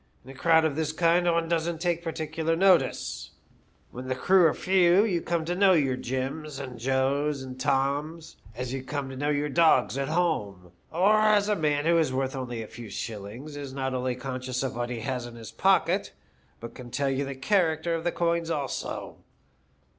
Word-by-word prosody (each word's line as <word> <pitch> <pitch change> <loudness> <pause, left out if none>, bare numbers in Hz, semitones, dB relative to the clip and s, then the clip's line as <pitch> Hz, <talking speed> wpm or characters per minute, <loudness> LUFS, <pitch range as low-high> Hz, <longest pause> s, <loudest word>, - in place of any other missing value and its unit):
In 130 - -10
a - - -11
crowd 160 +4 +3
of 150 -3 0
this 155 -1 -1
kind 170 +2 +2
one 170 -1 +2
doesn't 165 0 -1
take 170 -1 0
particular 160 0 -2
notice. 175 -7 +2 0.6
When 125 +1 -8
the 130 - -1
crew 180 +6 +5
are 155 - +1
few, 185 +1 +4
you 180 -6 0
come 170 -2 -1
to 175 - -1
know 190 +1 +5
your 140 -6 +2
Jims, 135 +4 -4
and 130 -4 -7
Joes, 135 +3 0
and 130 0 -9
Toms, 145 +4 -1 0.2
as 125 +1 -4
you 135 - -3
come 140 -1 -4
to - - -7
know 145 +3 -1
your 145 0 0
dogs 145 -4 +3
at 135 - -1
home, 105 - -1 0.2
or 195 +6 +4
as 215 -1 +3
a 210 - +3
man 150 -4 0
who 170 0 +4
is 155 -5 +1
worth 130 +1 -2
only 120 -3 -4
a - - -10
few 115 -1 -10
shillings 115 +8 -7
is 140 -2 -7
not 130 -1 -2
only 125 0 -1
conscious 125 0 -4
of 135 - -3
what 120 0 -3
he 120 -2 -4
has 125 0 -3
in 120 - -11
his 115 -2 -9
pocket, - - +2 0.5
but 115 0 -8
can 125 -1 -10
tell 135 +3 -1
you 135 +1 -1
the 140 0 -5
character 165 +1 +1
of 165 -1 -2
the 175 - 0
coins 170 -1 0
also. 145 -4 -4
145 Hz, 200 wpm, -27 LUFS, 130-165 Hz, 0.6 s, crew